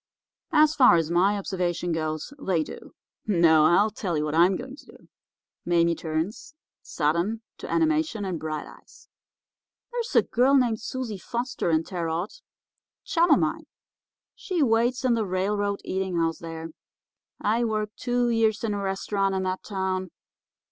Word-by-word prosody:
"'As 305 -1 +5
far 250 - +6
as 165 -1 0
my 190 +4 +3
observation 180 -3 -2
goes, 155 - -3
they 180 - 0
do. - - -11 0.3
No, 165 -6 +5
I'll 200 +7 +4
tell 185 -6 -3
you 150 - 0
what 150 - -3
I'm 175 +4 +4
going 260 +6 -7
to - - -16
do.' - - -17 0.6
Mame 170 -1 +2
turns, 165 - -4 0.3
sudden, 170 +9 -1 0.2
to - - -7
animation 315 -9 +1
and 180 -4 -3
bright 155 -1 -4
eyes. - - -17 0.8
'There's 475 0 -4
a - - +7
girl 260 +4 +3
named 240 -5 +2
Susie 230 -4 -5
Foster 240 0 -3
in 160 0 +2
Terre 170 -2 -4
Haute, 175 - -4
a - - -36 0.7
chum 345 -2 +2
of - - +6
mine. - - -2 0.7
She 355 -6 -1
waits 240 +1 +1
in 250 - +4
the 230 -1 +1
railroad 200 +1 -1
eating 190 -1 -2
house 165 -1 0
there. 165 0 -7 0.7
I 225 +3 +1
worked 215 -2 -2
two 245 -1 0
years 220 -2 +1
in 220 -2 0
a 200 - -3
restaurant 195 0 -1
in 190 - -1
that 185 0 -2
town. 190 -2 -3
195 Hz, 160 wpm, -26 LUFS, 170-235 Hz, 0.8 s, a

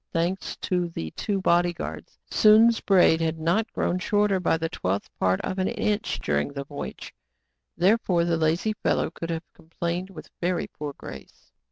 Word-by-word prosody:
Thanks 175 +3 -1
to 180 -2 0
the 80 - -5
two 200 -2 -2
body 175 -1 +3
guards. - - -7
Sounds 220 +2 +6
braid 180 -4 +4
had 160 0 0
not 175 +8 0
grown 180 - -1
shorter 205 0 +2
by 180 - +2
the 165 0 -2
twelfth 100 - -3
part 95 0 +2
of 190 - -3
an 185 - +1
inch 210 0 -1
during 145 - -1
the 140 -1 -4
voyage. 145 +1 -7 0.6
Therefore 180 -2 +3
the 170 -1 +1
lazy 165 +7 +1
fel - - 0
low - - -1
could 165 0 -6
have 165 -1 -3
complained 170 +2 -4
with 175 -5 -11
very 180 0 0
poor 150 -1 -7
grace. - - -12
175 Hz, 175 wpm, -25 LUFS, 160-195 Hz, 0.6 s, Sounds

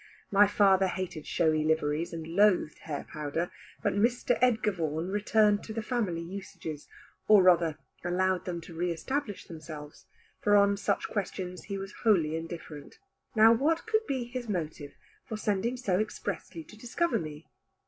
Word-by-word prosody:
My 205 +1 +6
father 195 -2 +4
hated 180 -4 -4
showy 155 -3 +2
liveries 160 +1 0
and 165 -1 -6
loathed 180 -2 +3
hair 145 -3 -5
powder, 155 +3 -3 0.3
but - - +2
Mr. 235 +4 +2
Edgar 225 -4 +3
Vaughan 165 -1 -2
returned 210 +1 +3
to 220 - -6
the 225 0 -3
family 210 -9 -1
usages, 165 -4 -7 0.4
or 210 -3 +7
rather 170 -4 +4 0.3
allowed 185 +1 +1
them 175 -2 -4
to 170 - -11
re 175 +2 -1
establish 210 - -3
themselves; 155 -2 -10 0.3
for 205 0 +3
on 200 0 +5
such 200 0 -1
questions 180 -3 -4
he 200 -2 -4
was 195 +1 -7
wholly 170 -9 +3
indifferent. 165 -2 -7 0.4
Now 220 +1 +8
what 310 - +1
could 440 0 0
be 265 -3 -1
his 240 -1 -6
motive 155 -6 -4 0.3
for 220 - -5
sending 215 +4 -1
so 195 -7 0
expressly 220 +8 -4
to 215 - -15
discover 245 +10 0
me? 155 -1 -7
190 Hz, 160 wpm, -29 LUFS, 165-215 Hz, 0.4 s, Now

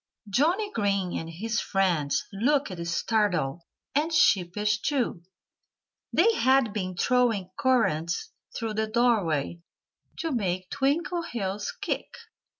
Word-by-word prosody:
Johnnie 340 - +1
Green 200 - 0
and 165 - -4
his 225 +8 -2
friends 175 -7 0
looked 255 0 +1
startled 175 - 0 0.3
and 305 +4 +1
sheepish, 210 - +2
too. 260 - -1 0.9
They 445 +7 +4
had 260 - +3
been 185 -3 -3
throwing 230 -6 +2
currants 170 -11 +1 0.3
through 225 -2 -3
the 220 +1 -1
doorway, 205 - +1 0.6
to 325 - -2
make 185 -7 -2
Twinkleheels 270 - -1
kick. - - -3
215 Hz, 105 wpm, -27 LUFS, 185-260 Hz, 0.9 s, They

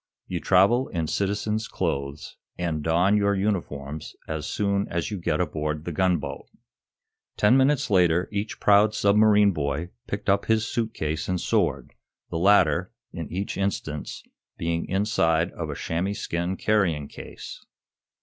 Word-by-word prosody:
You 90 - -3
travel 100 +10 +4
in 85 -3 -2
citizen's 105 +5 -1
clothes, 70 +1 -3 0.2
and 85 -3 -2
don 85 +6 +3
your 100 -1 +2
uniforms 80 -7 -3
as 80 -1 -4
soon 100 +2 0
as 85 +4 -3
you 100 - -3
get 85 - -1
aboard 75 -3 -2
the 85 - -3
gunboat." 80 -5 -1 0.9
Ten 105 +4 +5
minutes 140 +2 +3
later 90 -2 +3
each 105 +1 -3
proud 105 +1 +4
submarine 105 0 +5
boy 75 +2 -3 0.2
picked 100 0 -5
up 100 0 +2
his 110 0 +2
suit 115 -1 -2
case 80 +2 -3
and 90 -1 0
sword, 70 -5 0 0.4
the 80 - -2
latter, 90 -3 +4 0.2
in 85 -3 -6
each 95 +4 -3
instance, 90 -7 -3 0.3
being 85 0 -2
inside 90 -4 +1
of 85 -2 -5
a 70 - -4
chamois 90 +7 -2
skin 90 -3 -3
carrying 90 -9 +1
case. - - -10
90 Hz, 145 wpm, -25 LUFS, 80-105 Hz, 0.9 s, Ten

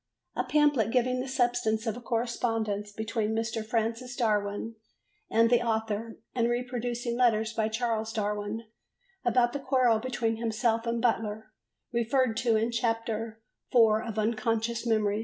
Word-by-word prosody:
A - - 0
pamphlet 295 -8 +3
giving 250 +1 +1
the 255 - -3
substance 245 -4 +1
of 220 -2 -1
a 245 - -8
correspondence 225 -3 -1
between 220 +1 -2
Mr. 225 0 -2
Francis 230 +2 -2
Darwin 210 -2 0 0.6
and 230 +1 +4
the 240 -1 +5
author 225 -1 -2 0.2
and 235 -1 +1
reproducing 240 -1 -2
letters 225 -3 +2
by 220 -1 +1
Charles 220 -1 -1
Darwin 210 0 -2 0.6
about 240 0 +3
the 285 - -2
quarrel 255 -4 +3
between 230 -2 -1
himself 230 0 0
and 230 0 0
Butler 220 -2 0 0.4
referred 235 0 +2
to 235 -3 +2
in 225 +2 +1
Chapter 225 -1 -2 0.3
IV 220 -3 +5
of 220 -1 -5
Unconscious 225 +1 0
Memory. 215 -2 +2
230 Hz, 140 wpm, -29 LUFS, 220-240 Hz, 0.6 s, the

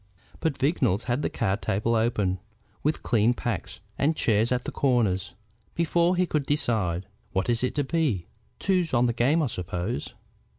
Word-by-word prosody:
But 160 -4 -1
Vignolles 130 - +1
had 125 +3 -1
the - - 0
card 110 -3 -1
table 110 +4 0
open, 105 -5 +1 0.4
with 150 +2 0
clean 115 +1 +3
packs, 120 -4 -4 0.2
and 155 +3 +2
chairs 110 -2 +2
at 125 -1 +1
the - - -4
corners, 115 -9 +1 0.4
before 170 +1 +2
he 180 +1 +2
could 150 -5 -1
decide. 105 - 0 0.3
"What 95 +5 0
is 120 +1 +1
it 125 - 0
to 145 - +1
be? 135 - 0 0.3
Twos 180 -7 +1
on 120 +1 +4
the 120 - +1
game 140 +8 +2
I - - +2
suppose." 90 +2 -4
120 Hz, 170 wpm, -26 LUFS, 105-150 Hz, 0.4 s, on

